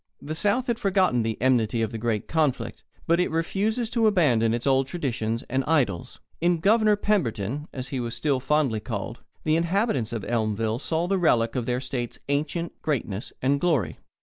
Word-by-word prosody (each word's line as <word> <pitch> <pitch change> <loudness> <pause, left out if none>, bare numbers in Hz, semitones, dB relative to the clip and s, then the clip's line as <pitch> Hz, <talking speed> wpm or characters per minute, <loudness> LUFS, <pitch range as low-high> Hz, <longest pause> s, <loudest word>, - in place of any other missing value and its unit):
The 150 - -5
South 205 +9 +1
has 235 -2 -1
forgotten 190 - +2
the 110 0 -2
enmity 115 -3 +2
of 110 - -2
the 115 - -5
great 110 -2 -1
conflict, 155 -5 -1 0.2
but 170 +1 +3
it 180 - +2
refuses 200 +8 0
to 230 -2 +3
abandon 130 - +3
its 120 +1 -2
old 135 -1 +3
traditions 115 -8 -2
and 130 +1 0
idols. 125 - 0 0.2
In 175 +1 +2
"Governor" 215 +4 +4
Pemberton, 145 - -1
as 130 -1 -6
he 135 - -3
was 120 -1 -3
still 140 -4 0
fondly 135 -4 +1
called, 110 +1 -5 0.2
the 155 0 +2
inhabitants 165 - +1
of 115 -4 -4
Elmville 110 0 0
saw 165 +4 -1
the 195 +1 +1
relic 115 -9 +2
of 125 -3 -2
their 125 0 0
state's 125 -2 -4
ancient 155 +4 -2
greatness 115 -8 -2
and 140 +2 +2
glory. 160 -10 +1
135 Hz, 180 wpm, -25 LUFS, 115-170 Hz, 0.2 s, Governor